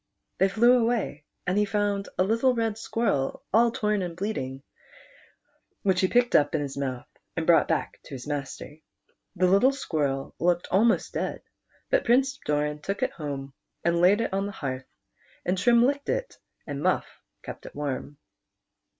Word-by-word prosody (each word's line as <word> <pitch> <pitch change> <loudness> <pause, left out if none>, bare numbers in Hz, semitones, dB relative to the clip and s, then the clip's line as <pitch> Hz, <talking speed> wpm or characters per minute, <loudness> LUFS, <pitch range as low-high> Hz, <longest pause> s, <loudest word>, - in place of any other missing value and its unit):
They 195 - +4
flew 240 +5 +5
away, 225 -10 -1 0.2
and 185 +3 +1
he 210 - +3
found 205 -1 -1
a 185 - +4
little 230 +6 +2
red 225 -2 0
squirrel 220 - -1
all 235 +2 +5
torn 210 -3 0
and 175 -2 -4
bleeding, 135 -10 -3 1.2
which 190 -2 +2
he 185 - +4
picked 245 +3 +2
up 145 +1 +4
in 155 - +1
his 140 -2 -4
mouth, 130 -3 -3 0.3
and 165 - -1
brought 170 0 +5
back 160 - -1
to 145 - -8
his 125 - -8
master. 145 0 -5 0.6
The 185 0 +2
little 200 +9 +5
Squirrel 145 - -2
looked 175 0 +1
almost 225 +5 +3
dead, - - -3 0.5
but - - +3
Prince 270 +3 +3
Doran 150 0 0
took 195 +5 -2
it - - +1
home 140 -3 -6 0.3
and 170 0 +2
laid 195 +5 +5
it 230 - -2
on 195 +1 0
the - - -5
hearth, 130 -5 -5 0.6
and 180 - +1
Trim 235 +4 +4
licked 285 +1 -1
it, - - -2 0.3
and 145 -1 -5
Muff - - +2 0.4
kept - - -8
it - - -12
warm. 145 0 -4
185 Hz, 170 wpm, -27 LUFS, 145-225 Hz, 1.2 s, flew